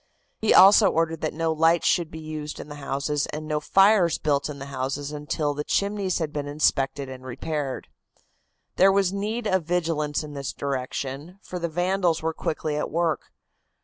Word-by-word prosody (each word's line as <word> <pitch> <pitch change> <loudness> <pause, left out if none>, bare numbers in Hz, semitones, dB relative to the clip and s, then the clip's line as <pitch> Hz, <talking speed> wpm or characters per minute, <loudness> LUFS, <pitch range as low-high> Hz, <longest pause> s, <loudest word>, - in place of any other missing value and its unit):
He 220 - +2
also 200 +1 +8
ordered 165 -1 0
that 155 - -1
no 165 0 -1
lights 165 +2 +3
should 170 -3 +2
be 160 - -9
used 155 -1 -6
in - - -8
the 145 - -8
houses 140 +2 -1
and 155 +1 -6
no 150 -1 0
fires 195 +1 +4
built 145 -1 0
in 145 - -6
the 140 - -7
houses 135 +2 -3
until 150 0 -2
the 150 +1 -4
chimneys 200 +1 0
had 160 -3 -3
been 145 -1 -3
inspected 140 -1 0
and 130 -1 -9
repaired. 135 +2 -4 0.9
There 195 +1 +6
was 195 -1 +2
need 215 +4 -3
of 190 -5 +1
vigilance 160 -4 -1
in 150 -1 -8
this 140 -2 -4
direction, 140 +4 -4
for 180 - -6
the 170 0 -2
vandals 175 0 0
were 160 0 0
quickly 155 -1 -3
at - - -2
work. 165 -1 -1
155 Hz, 180 wpm, -25 LUFS, 145-175 Hz, 0.9 s, also